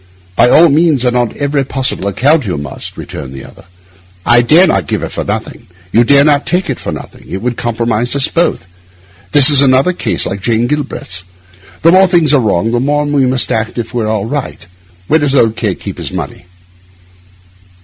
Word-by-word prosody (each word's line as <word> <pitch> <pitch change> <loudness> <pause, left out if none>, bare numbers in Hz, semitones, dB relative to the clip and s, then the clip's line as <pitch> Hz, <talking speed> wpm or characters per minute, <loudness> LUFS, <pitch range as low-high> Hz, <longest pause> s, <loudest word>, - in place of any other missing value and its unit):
By 120 +5 +4
all 165 +5 +6
means 150 -3 +2
and 125 0 +1
on 120 -2 0
every 140 -1 -1
possible 130 -6 -3
account, 135 - +1
you 90 - -2
must,' 70 -1 -8
returned 65 -1 -8
the 65 - -9
other. - - -16 0.6
'I 120 0 +5
dare 155 +10 +5
not 95 - 0
give - - -2
it - - -5
for - - -4
nothing, - - -5 0.2
you 115 - +4
dare 140 +3 +5
not 145 -1 +2
take 180 +2 -1
it - - -5
for - - -5
nothing; - - -10
it 95 - -4
would 125 0 -2
compromise 120 +1 -2
us 140 -1 +1
both. 165 - -1 0.7
This 145 0 +6
is 140 -2 +4
another 135 +5 +3
case 110 - -2
like 95 +2 -4
Jane 115 +2 0
Galbraith's. 120 -9 -4 0.6
The 165 - +6
more 190 +1 +5
things 170 -5 +2
are 140 - +4
wrong 110 0 0
the 120 - 0
more 145 +3 0
we 145 -3 +1
must 130 -1 +1
act 110 +2 -2
as 120 - -2
if - - -17
all 110 -3 -1
were - - -5
right. 140 - -5 0.4
Where 160 - +3
does 145 -2 0
old 115 -4 +3
K— 105 -6 -2
keep - - -8
his - - -5
money? - - -6
125 Hz, 205 wpm, -13 LUFS, 110-145 Hz, 0.7 s, all